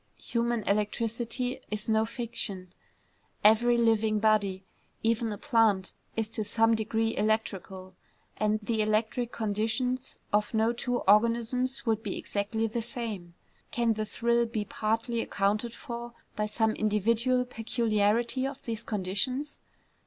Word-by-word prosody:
Human 235 Hz, -1 st, -1 dB
electricity 230 Hz, +5 st, -1 dB
is 210 Hz, 0 st, -3 dB
no 220 Hz, 0 st, +2 dB
fiction: 220 Hz, -6 st, -2 dB, 0.7 s
every 235 Hz, +3 st, +5 dB
living 225 Hz, -2 st, +3 dB
body, 205 Hz, -3 st, +2 dB, 0.4 s
even 230 Hz, 0 st, +1 dB
a 205 Hz, -, -4 dB
plant, 225 Hz, -9 st, +2 dB, 0.2 s
is 225 Hz, -1 st, 0 dB
to 220 Hz, -1 st, -1 dB
some 225 Hz, +2 st, +3 dB
degree 225 Hz, 0 st, 0 dB
electrical; 195 Hz, -3 st, -2 dB, 0.4 s
and 215 Hz, 0 st, +1 dB
the 220 Hz, 0 st, 0 dB
electric 220 Hz, +3 st, 0 dB
conditions 225 Hz, +4 st, -1 dB, 0.2 s
of 210 Hz, +2 st, +1 dB
no 220 Hz, +2 st, +3 dB
two 245 Hz, +1 st, -1 dB
organisms 235 Hz, +5 st, +2 dB
would 220 Hz, -2 st, +1 dB
be 210 Hz, -4 st, -4 dB
exactly 210 Hz, +2 st, -2 dB
the 225 Hz, +1 st, -2 dB
same. 220 Hz, -8 st, -4 dB, 0.3 s
Can 235 Hz, -1 st, +1 dB
the 215 Hz, 0 st, -2 dB
thrill 235 Hz, +2 st, +1 dB
be 220 Hz, -2 st, -3 dB
partly 225 Hz, +3 st, -1 dB
accounted 210 Hz, +4 st, 0 dB
for 235 Hz, -2 st, -7 dB, 0.2 s
by 210 Hz, 0 st, 0 dB
some 220 Hz, +1 st, +1 dB
individual 230 Hz, +4 st, +1 dB
peculiarity 230 Hz, +1 st, +1 dB
of 275 Hz, 0 st, -8 dB
these 225 Hz, -2 st, -3 dB
conditions? 220 Hz, +9 st, -2 dB
225 Hz, 130 wpm, -29 LUFS, 210-235 Hz, 0.7 s, every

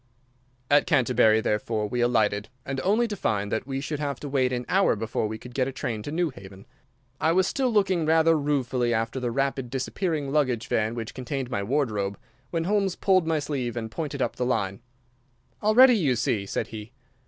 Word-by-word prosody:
At 145 Hz, 0 st, +5 dB
Canterbury, 125 Hz, -7 st, +4 dB
therefore, 105 Hz, 0 st, -1 dB
we 120 Hz, +3 st, -2 dB
alighted, 110 Hz, -3 st, +1 dB, 0.3 s
only 220 Hz, +5 st, +2 dB
to 210 Hz, -, -4 dB
find 105 Hz, -, -1 dB
that 110 Hz, +3 st, -2 dB
we 135 Hz, -1 st, -2 dB
should 145 Hz, +1 st, -4 dB
have 140 Hz, -3 st, -3 dB
to 145 Hz, -, -5 dB
wait 130 Hz, -2 st, +1 dB
an 125 Hz, -1 st, -2 dB
hour 195 Hz, -7 st, +3 dB
before 110 Hz, 0 st, -2 dB
we 110 Hz, +1 st, -5 dB
could 125 Hz, +2 st, -12 dB
get 130 Hz, 0 st, 0 dB
a -, -, -3 dB
train 115 Hz, -4 st, -4 dB
to 145 Hz, -, -6 dB
Newhaven. 100 Hz, -, -4 dB, 0.5 s
I 160 Hz, -, +2 dB
was 185 Hz, +1 st, +3 dB
still 260 Hz, +4 st, 0 dB
looking 190 Hz, -7 st, +2 dB
rather 160 Hz, +1 st, +4 dB
ruefully 130 Hz, -5 st, 0 dB
after 115 Hz, +3 st, -2 dB
the 125 Hz, -1 st, -2 dB
rapidly 135 Hz, 0 st, -1 dB
disappearing 145 Hz, +3 st, -2 dB
luggage 130 Hz, -6 st, +1 dB
van 110 Hz, +1 st, 0 dB
which 115 Hz, -2 st, -5 dB
contained 130 Hz, 0 st, -4 dB
my 100 Hz, -, -1 dB
wardrobe, 105 Hz, -5 st, -1 dB, 0.3 s
when 165 Hz, -1 st, -1 dB
Holmes 195 Hz, 0 st, +1 dB
pulled 185 Hz, -4 st, +2 dB
my 160 Hz, -1 st, +2 dB
sleeve 135 Hz, -5 st, -3 dB
and 110 Hz, -1 st, -4 dB
pointed 145 Hz, -3 st, -3 dB
up -, -, -3 dB
the 125 Hz, -, -1 dB
line. 100 Hz, -6 st, -1 dB, 0.8 s
"Already, 245 Hz, +4 st, +6 dB
you 140 Hz, -10 st, +2 dB
see," 110 Hz, -3 st, -1 dB
said -, -, -3 dB
he. 110 Hz, +2 st, -9 dB
130 Hz, 190 wpm, -26 LUFS, 110-155 Hz, 0.8 s, Already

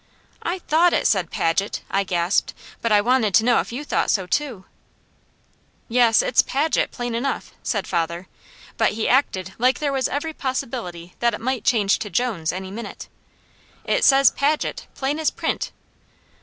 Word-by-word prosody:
"I 350 Hz, +2 st, -2 dB
THOUGHT 345 Hz, 0 st, +3 dB
it -, -, +1 dB
said 185 Hz, -5 st, +2 dB
'Paget,'" 175 Hz, +5 st, -1 dB
I 195 Hz, 0 st, +2 dB
gasped, 175 Hz, 0 st, 0 dB, 0.3 s
"but 230 Hz, -, -1 dB
I 205 Hz, -1 st, +5 dB
wanted 230 Hz, -3 st, +2 dB
to 220 Hz, -, +5 dB
know 245 Hz, -1 st, +4 dB
if -, -, -4 dB
you 255 Hz, +5 st, -5 dB
thought -, -, 0 dB
so 190 Hz, -3 st, +1 dB
too." 230 Hz, -1 st, -2 dB, 1.2 s
"Yes, 235 Hz, -2 st, +4 dB
it's 240 Hz, -, +4 dB
Paget 300 Hz, +4 st, 0 dB
plain 245 Hz, -1 st, -4 dB
enough," 255 Hz, +4 st, -3 dB
said 205 Hz, -4 st, -2 dB
father, 170 Hz, +1 st, -2 dB, 0.5 s
but -, -, +2 dB
he 220 Hz, +1 st, -1 dB
acted 190 Hz, -8 st, +1 dB
like 255 Hz, +2 st, +3 dB
there 285 Hz, -2 st, -1 dB
was 265 Hz, -1 st, +1 dB
every 305 Hz, +3 st, -3 dB
possibility 230 Hz, -, -4 dB
that 235 Hz, -2 st, +2 dB
it -, -, -9 dB
might 255 Hz, -1 st, -2 dB
change 210 Hz, -5 st, +2 dB
to 210 Hz, -, -5 dB
Jones 200 Hz, -10 st, -1 dB
any 190 Hz, +1 st, -6 dB
minute. 230 Hz, +3 st, -8 dB, 0.8 s
"It -, -, +1 dB
says 270 Hz, -1 st, +6 dB
'Paget,' 295 Hz, +2 st, -1 dB
plain 280 Hz, +3 st, -2 dB
as 315 Hz, -, +2 dB
print." -, -, -3 dB
235 Hz, 170 wpm, -22 LUFS, 195-270 Hz, 1.2 s, says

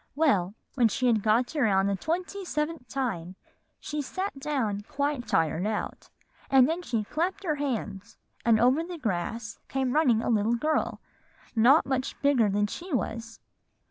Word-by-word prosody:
"Well, 210 Hz, -, +2 dB, 0.2 s
when 245 Hz, -4 st, +4 dB
she 255 Hz, +4 st, -1 dB
had 230 Hz, -4 st, +3 dB
got 230 Hz, +7 st, +2 dB
around 205 Hz, -9 st, +3 dB
the 200 Hz, 0 st, +1 dB
twenty 360 Hz, -, -3 dB
seventh 300 Hz, -5 st, -3 dB
time, 195 Hz, -11 st, -3 dB, 0.4 s
she 300 Hz, 0 st, -3 dB
sat 370 Hz, +2 st, -4 dB
down 250 Hz, -9 st, -1 dB
quite 285 Hz, -3 st, -1 dB
tired 165 Hz, +4 st, +1 dB
out; 215 Hz, -1 st, -4 dB, 0.4 s
and 265 Hz, -2 st, +6 dB
then 330 Hz, +3 st, -1 dB
she 235 Hz, -10 st, -1 dB
clapped 345 Hz, -, -2 dB
her 325 Hz, -5 st, +1 dB
hands, 230 Hz, -7 st, -4 dB, 0.3 s
and 230 Hz, -2 st, +4 dB
over 255 Hz, +7 st, +4 dB
the 350 Hz, 0 st, -7 dB
grass 220 Hz, -, -3 dB
came 265 Hz, -2 st, -1 dB
running 250 Hz, -8 st, +3 dB
a -, -, -1 dB
little 220 Hz, +1 st, +2 dB
girl 305 Hz, +6 st, -1 dB, 0.5 s
not 250 Hz, +8 st, +6 dB
much 265 Hz, -1 st, -2 dB
bigger 260 Hz, -7 st, +4 dB
than 205 Hz, +1 st, +1 dB
she 345 Hz, -, -7 dB
was. 230 Hz, -3 st, -3 dB
250 Hz, 160 wpm, -28 LUFS, 215-300 Hz, 0.5 s, and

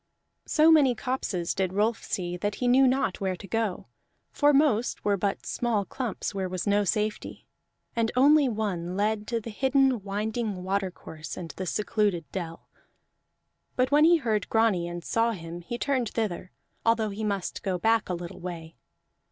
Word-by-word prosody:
So 315 Hz, +1 st, +5 dB
many 280 Hz, -6 st, +5 dB
copses 215 Hz, -10 st, -2 dB
did 190 Hz, -2 st, -1 dB
Rolf 215 Hz, +3 st, +1 dB
see 175 Hz, -3 st, -3 dB
that 205 Hz, +3 st, -2 dB
he 250 Hz, -, -1 dB
knew 260 Hz, +2 st, +6 dB
not 255 Hz, -8 st, 0 dB
where 190 Hz, -1 st, 0 dB
to 195 Hz, -, -11 dB
go, 225 Hz, -3 st, -1 dB, 0.5 s
for 290 Hz, 0 st, +4 dB
most 275 Hz, -5 st, +2 dB
were 205 Hz, -1 st, +3 dB
but 200 Hz, +1 st, -2 dB
small 225 Hz, -5 st, 0 dB
clumps, 235 Hz, -4 st, -4 dB
where 190 Hz, -2 st, -2 dB
was 185 Hz, -1 st, -3 dB
no 205 Hz, 0 st, +3 dB
safety; 210 Hz, +2 st, -2 dB, 0.5 s
and 230 Hz, -1 st, +1 dB
only 285 Hz, +2 st, +5 dB
one 190 Hz, -5 st, -3 dB
led 210 Hz, +1 st, 0 dB
to 235 Hz, -, -1 dB
the 230 Hz, +1 st, -8 dB
hidden 265 Hz, 0 st, +2 dB
winding 210 Hz, 0 st, -3 dB
watercourse 185 Hz, -5 st, -4 dB
and 170 Hz, -3 st, -6 dB
the 185 Hz, -, -6 dB
secluded 205 Hz, -4 st, 0 dB
dell. 165 Hz, -3 st, -6 dB, 1.1 s
But 255 Hz, +1 st, +1 dB
when 295 Hz, +1 st, +5 dB
he 340 Hz, +1 st, +6 dB
heard 220 Hz, -, -1 dB
Grani 220 Hz, -6 st, +2 dB
and 175 Hz, 0 st, -6 dB
saw 230 Hz, 0 st, +1 dB
him, 170 Hz, -2 st, -7 dB
he 235 Hz, +8 st, -5 dB
turned 255 Hz, -4 st, 0 dB
thither, 185 Hz, -5 st, -3 dB, 0.3 s
although 230 Hz, -1 st, +2 dB
he 210 Hz, +2 st, -5 dB
must 200 Hz, -3 st, -2 dB
go 185 Hz, -2 st, -1 dB
back 225 Hz, +3 st, +2 dB
a 180 Hz, -, 0 dB
little 175 Hz, 0 st, -8 dB
way. 165 Hz, -2 st, -7 dB
210 Hz, 170 wpm, -27 LUFS, 185-235 Hz, 1.1 s, knew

